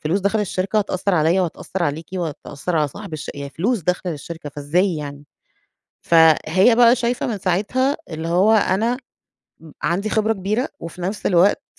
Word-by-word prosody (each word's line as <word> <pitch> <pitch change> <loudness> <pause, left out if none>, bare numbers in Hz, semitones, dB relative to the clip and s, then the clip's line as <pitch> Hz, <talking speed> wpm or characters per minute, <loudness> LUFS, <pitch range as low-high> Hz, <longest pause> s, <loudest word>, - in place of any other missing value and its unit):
فلوس 170 +6 0
داخلة 205 +3 +1
للشركة 195 +2 -1
هتأثّر 195 -1 -1
عليّا 165 +4 +3
وهتأثّر 180 +2 -4
عليكِ 150 +2 -3
وهتأثّر 165 -1 -4
على 150 -2 +2
صاحب 200 +3 -10
الش 150 - -6
يعني 140 0 -6
فلوس 210 - 0
داخلة 180 +1 -1
للشركة، 150 +1 -8
فإزاي 165 +6 0
يعني! 145 -1 -7 0.8
فهي 165 +6 +5
بقى 240 +1 +6
شايفة 240 0 -1
من 220 -4 -3
ساعتها 210 +10 0
اللي 160 +1 -4
هو 190 +6 +4
أنا 220 +3 +2 0.6
م 160 -2 -14
عندي 200 +5 0
خبرة 220 0 +2
كبيرة، 215 +5 -1
وفي 170 +2 -8
نفْس 195 +4 -3
الوقت 185 +2 +3
180 Hz, 165 wpm, -21 LUFS, 160-210 Hz, 0.8 s, بقى